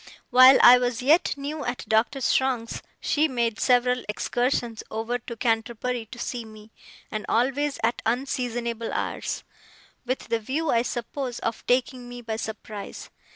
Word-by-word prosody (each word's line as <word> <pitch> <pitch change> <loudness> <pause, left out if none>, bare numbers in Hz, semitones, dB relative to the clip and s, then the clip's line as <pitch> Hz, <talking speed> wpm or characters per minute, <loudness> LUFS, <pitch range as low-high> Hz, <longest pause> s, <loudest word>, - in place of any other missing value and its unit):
While 255 +1 +9
I 250 +1 +10
was 245 0 -1
yet 305 +5 +4
new 290 +2 -4
at 245 0 -4
Doctor 225 +5 +1
Strong's, 250 -3 0 0.2
she 305 +1 +2
made 235 -5 -1
several 250 0 +3
excursions 240 +1 -1
over 225 +3 -2
to 235 0 -8
Canterbury 230 +1 -1
to 240 - -11
see 240 0 -4
me, 215 0 -14 0.4
and 215 -1 -3
always 275 +5 +1
at 230 +1 +1
unseasonable 235 -1 -2
hours: - - -3 0.6
with 255 0 -3
the 230 0 +1
view, 285 +8 -1
I 230 - +3
suppose, 245 +1 -4
of 230 -1 -3
taking 250 0 0
me 245 0 -8
by 220 -1 -3
surprise. 215 -2 -7
245 Hz, 150 wpm, -25 LUFS, 225-255 Hz, 0.6 s, I